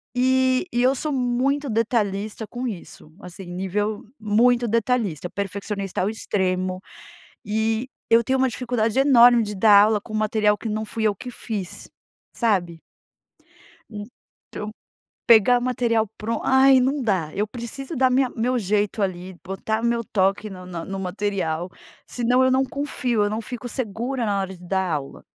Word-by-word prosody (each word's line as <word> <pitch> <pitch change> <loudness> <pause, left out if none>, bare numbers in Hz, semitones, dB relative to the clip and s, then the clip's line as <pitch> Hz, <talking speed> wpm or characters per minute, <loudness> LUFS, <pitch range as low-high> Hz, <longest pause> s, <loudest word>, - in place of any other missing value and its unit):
E 260 +2 +2
e 240 - +1
eu 260 +1 +4
sou 305 +4 -2
muito 265 +2 0
detalhista 215 -2 -1
com 245 +4 -5
isso, 170 -6 -9
assim 180 +1 -10
nível 195 +4 -3 0.2
muito 235 +3 +3
detalhista, 220 - 0
perfeccionista 200 0 -4
ao 190 - +1
extremo, 185 -3 -2 0.6
e 220 +3 -1 0.2
eu 230 +1 +5
tenho 260 +3 0
uma 265 - +3
dificuldade 240 -1 -1
enorme 245 -3 +6
de 210 -1 -4
dar 205 0 +7
aula 215 -1 +2
com 215 - -11
material 215 -1 +2
que 225 - -5
não 215 +1 -2
fui 220 +1 -4
eu 210 - +3
que 250 - -8
fiz, 210 -6 -6 0.4
sabe? 180 -8 0 1.1
Então 210 -1 -10 0.6
pegar 235 +1 +6
material 235 -3 +1
pronto, 225 +1 -3
ai 265 0 +6
não 270 +3 +1
dá, 185 -9 0
eu 210 +2 0
preciso 255 +7 -7
da 260 0 +3
minha 260 +1 +3
meu 245 +2 -1
jeito 205 +1 0
ali, 185 -1 -3
botar 220 +4 -3
meu 235 0 0
toque 200 +1 0
no 185 -1 -10
na 170 -2 -6
no 195 0 -5
material, 185 -3 -2 0.4
senão 245 +2 +2
eu 260 - +3
não 260 +1 +3
confio, 255 -5 -1
eu 205 - 0
não 215 - -2
fico 245 +2 -7
segura 240 +1 -3
na 200 -1 0
hora 190 0 -4
de 180 - -16
dar 190 -1 0
aula. 140 -3 -5
220 Hz, 160 wpm, -23 LUFS, 195-245 Hz, 1.1 s, dar